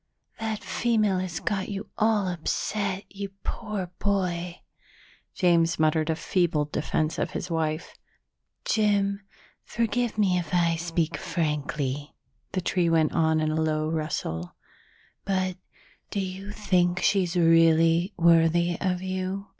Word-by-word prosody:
That 220 -1 -3
female 215 -5 +1
has 180 -3 -3
got 195 -3 -2
you 200 +1 -5
all 215 -3 +2
upset, 190 +3 -2
you 200 0 -6
poor 210 -6 -4
boy." 180 -3 -1 0.7
James 170 -2 +3
muttered 155 0 +2
a 160 - +2
feeble 165 -2 +1
defense 155 +1 -1
of - - 0
his 175 - -4
wife. 160 0 -2 0.7
"Jim, 200 -2 +1 0.4
forgive 235 0 -1
me 190 -4 +3
if 170 0 -3
I 170 -1 +3
speak 165 -1 -1
frankly," 150 -3 -2 0.4
the 185 - 0
tree 175 -1 +1
went 160 -2 +3
on 160 -1 +2
in 155 0 0
a 160 +1 0
low 155 0 0
rustle, 150 - -3 0.7
"but 185 -1 -1 0.5
do 200 - -2
you 190 +1 -5
think 180 -4 +1
she's 185 -3 +2
really 165 +1 +4
worthy 170 +1 +4
of 185 -1 -1
you?" 190 +1 -3
175 Hz, 130 wpm, -26 LUFS, 160-195 Hz, 0.7 s, really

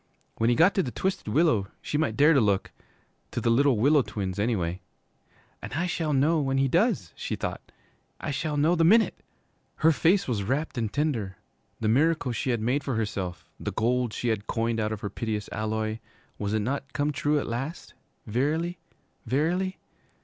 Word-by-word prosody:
When 115 +1 +2
he 120 - +3
got 165 +7 +5
to 195 - +2
the 135 - -3
Twisted 190 - -2
Willow 115 - +2
she - - -5
might 145 -8 0
dare 150 +4 +6
to 135 - +4
look 100 -3 +1 0.6
to - - -3
the 115 - +1
Little 135 0 +4
Willow 140 +6 +5
Twins, 95 -5 -4
anyway. 95 -5 -1 0.8
'And - - -7
I 165 +5 0
shall 165 -3 -1
know 150 +3 +3
when 135 -1 0
he 135 0 +3
does,' 170 - +1
she - - -3
thought. - - -5 0.5
'I - - -3
shall 150 +1 -2
know 155 +4 +3
the 165 -2 +2
minute!' 220 +7 +4 0.5
Her 160 +1 +4
face 170 +7 +3
was 115 -5 -1
rapt 135 +11 -1
and 115 -4 -2
tender. 120 - -1 0.4
The 110 - +1
miracle 145 +3 +2
she 120 +3 -2
had 120 -3 0
made 130 +6 0
for 135 - -2
herself, 95 -6 -3
the - - -4
gold 120 +1 +1
she 120 +2 -2
had 105 -2 -2
coined 115 0 0
out 110 0 0
of 110 -1 -4
her 100 - -3
piteous 105 -1 -3
alloy, 110 0 -2 0.4
was 105 +1 -1
it 110 - +1
not 135 +4 -3
come 145 +1 0
true 150 +1 +1
at - - -3
last? 135 +8 -5 0.3
Verily, 155 +9 -1 0.5
verily? 175 +9 0
130 Hz, 190 wpm, -27 LUFS, 110-155 Hz, 0.8 s, dare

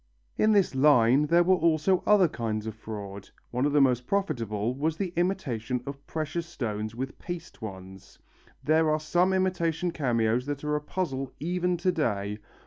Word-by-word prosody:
In 215 - +3
this 200 -7 +3
line 135 0 +4
there 170 +3 +5
were 185 +2 +4
also 170 +2 +2
other 205 -4 +6
kinds 110 -6 -3
of 110 - -4
fraud. 100 -2 -8 0.2
One 125 +4 +1
of - - -1
the 145 - +4
most 125 -3 +2
profitable 120 - -1
was 155 +4 -1
the 180 -2 -3
imitation 130 - -1
of 140 0 -8
precious 160 +2 -3
stones 110 -8 -4
with 130 +2 -5
paste 175 -6 -7
ones. 95 -2 -9 0.5
There 155 +1 +3
are 155 0 +2
some 175 +4 +2
imitation 180 -2 0
cameos 120 -4 0
that 145 0 -4
are 150 0 0
a 150 - -1
puzzle 135 -5 -3
even 180 +2 0
to 185 +2 +1
day. 105 - -1
145 Hz, 170 wpm, -27 LUFS, 115-175 Hz, 0.5 s, other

